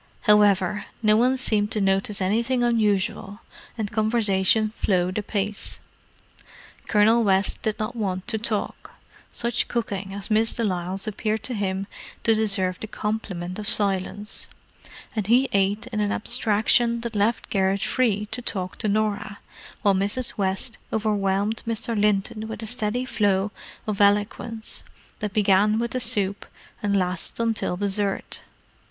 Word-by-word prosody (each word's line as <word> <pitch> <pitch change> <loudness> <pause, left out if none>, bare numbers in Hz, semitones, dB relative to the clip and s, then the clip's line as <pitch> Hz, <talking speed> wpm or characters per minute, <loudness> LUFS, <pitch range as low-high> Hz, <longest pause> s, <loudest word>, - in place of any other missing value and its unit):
However, 205 -2 +3 0.2
no 215 0 +5
one 250 +4 +3
seemed 215 -5 0
to 215 - 0
notice 195 +1 +1
anything 235 +6 +1
unusual, 210 -2 0 0.4
and 215 -3 -3
conversation 215 -1 +2
flowed 185 -2 0
apace. 210 -1 -3 1.1
Colonel 220 +2 +4
West 195 -1 +1
did 215 -1 -1
not 215 +3 -3
want 190 -4 -3
to 220 -2 0
talk: 215 -1 -3 0.4
such 235 0 -1
cooking 200 -5 -3
as 200 +2 -5
Miss 220 +1 +2
de 235 - -1
Lisle's 185 -1 -1
appeared 215 +1 -2
to 250 - -2
him 195 -2 -1 0.4
to 225 - +4
deserve 200 -4 +2
the 220 - -5
compliment 200 -4 -4
of 210 - -4
silence, 200 +1 0 0.7
and 210 -3 -1
he 250 +4 +4
ate 200 +3 +1
in 215 - -1
an 205 -1 +1
abstraction 230 +3 +2
that 235 -1 -5
left 210 +3 0
Garrett 195 0 +1
free 215 -5 +1
to 245 - -3
talk 185 -6 -4
to - - -1
Norah; 205 -1 -1 0.5
while 200 - +5
Mrs. 205 +6 -1
West 195 +4 -2
overwhelmed 205 0 0
Mr. 230 0 -2
Linton 210 +1 +1
with 220 0 -6
a - - -3
steady 245 +1 -2
flow 205 -4 +1 0.3
of 210 -2 -2
eloquence 210 +2 +1 0.4
that 210 - -3
began 210 +1 +4
with 235 +1 -1
the 255 - -1
soup 205 -5 -1 0.3
and 200 -2 +1
lasted 180 +4 0
until 225 -5 0
dessert. 200 0 -1
210 Hz, 145 wpm, -24 LUFS, 195-220 Hz, 1.1 s, no